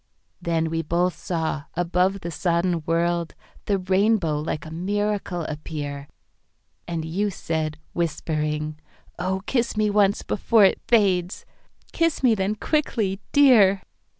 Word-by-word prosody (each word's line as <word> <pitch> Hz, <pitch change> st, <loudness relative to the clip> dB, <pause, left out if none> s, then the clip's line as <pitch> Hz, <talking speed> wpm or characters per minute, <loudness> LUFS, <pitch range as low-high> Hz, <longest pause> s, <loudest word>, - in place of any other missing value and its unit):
Then 165 Hz, -1 st, 0 dB
we 165 Hz, 0 st, 0 dB
both 170 Hz, +3 st, 0 dB
saw, 160 Hz, -4 st, -3 dB
above 180 Hz, +3 st, +1 dB
the 170 Hz, -, -5 dB
sodden 170 Hz, +1 st, 0 dB
world, 170 Hz, 0 st, 0 dB, 0.3 s
The 200 Hz, -, +1 dB
Rainbow 190 Hz, -4 st, +1 dB
like 150 Hz, 0 st, -4 dB
a 155 Hz, -, -9 dB
miracle 200 Hz, 0 st, -2 dB
appear, 145 Hz, -2 st, -5 dB, 0.8 s
And 165 Hz, -2 st, -3 dB
you 195 Hz, +6 st, -1 dB
said, 160 Hz, -4 st, -3 dB, 0.2 s
whispering, 155 Hz, -2 st, -2 dB, 0.4 s
"Oh, 190 Hz, +2 st, -2 dB
kiss 240 Hz, -2 st, 0 dB
me 210 Hz, -1 st, +2 dB
onceBefore 205 Hz, +1 st, +3 dB
it -, -, -13 dB
fades!"—"Kiss 205 Hz, -, 0 dB
me 245 Hz, -3 st, +5 dB
then 200 Hz, 0 st, 0 dB
quickly, 215 Hz, -7 st, -1 dB
Dear!" 220 Hz, -9 st, +5 dB
180 Hz, 120 wpm, -24 LUFS, 160-205 Hz, 0.8 s, me